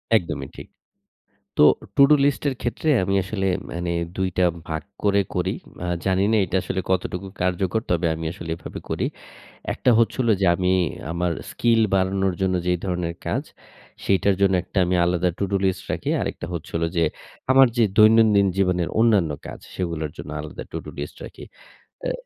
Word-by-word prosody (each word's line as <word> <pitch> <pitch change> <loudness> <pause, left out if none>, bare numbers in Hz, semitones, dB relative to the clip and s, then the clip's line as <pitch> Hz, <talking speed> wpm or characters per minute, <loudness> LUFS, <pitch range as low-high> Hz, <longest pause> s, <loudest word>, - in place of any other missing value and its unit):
একদমই 75 -9 -1
ঠিক। - - -9 0.9
তো, - - +7 0.3
টু-ডু 140 +2 +7
লিস্ট 145 -1 +1
এর 135 - -1
ক্ষেত্রে 120 +6 -2
আমি 95 +1 0
আসলে 95 0 -2 0.3
মানে 85 0 -3 0.3
২ 95 0 0
টা 90 - +5 0.2
ভাগ 80 0 -3 0.2
করে 100 0 +4
করি। 90 +1 0 0.3
আ - - -2 0.2
জানিনা 95 +3 +2
এইটা 95 +2 -2
আসলে 95 - -2
কতটুকু 95 +1 -1
কার্যকর, 90 +3 0
তবে 85 -1 +1
আমি 80 +1 -6
আসলে 85 -3 -8
এভাবে - - -8
করি। - - 0 0.7
১ - - -5
টা 125 - +7
হচ্ছে 115 - +2
হলো 115 -3 +3
যে, - - +4
আমি 90 0 0 0.4
আমার 85 0 -1 0.2
স্কিল 115 -1 +2
বাড়ানোর 95 0 +1
জন্য 95 -1 +1
যেই 90 0 +2
ধরনের 90 -2 -2
কাজ, - - -1 0.6
সেইটার 95 0 +3
জন্য 95 -1 +4
একটা 95 - -9
আমি 90 +1 +1
আলাদা 90 0 +1
টু-ডু 100 0 -1
লিস্ট 95 0 0
রাখি। - - -3
আরেকটা - - -4
হচ্ছে 85 -2 -6
হলো 85 0 +1
যে, 85 - +4 0.5
আমার 135 -1 +7
যে 115 - +5
দৈনন্দিন 110 -2 +6
জীবনের 90 -3 +1
অন্যান্য 105 -9 +4 0.2
কাজ, - - -8 0.2
সেগুলার 85 -4 -3
জন্য - - -8
আলাদা 75 - -8
টু-ডু - - -6
লিস্ট 75 - -6
রাখি। - - -11 0.6
অ্যা - - -1
95 Hz, 175 wpm, -23 LUFS, 85-100 Hz, 0.9 s, তো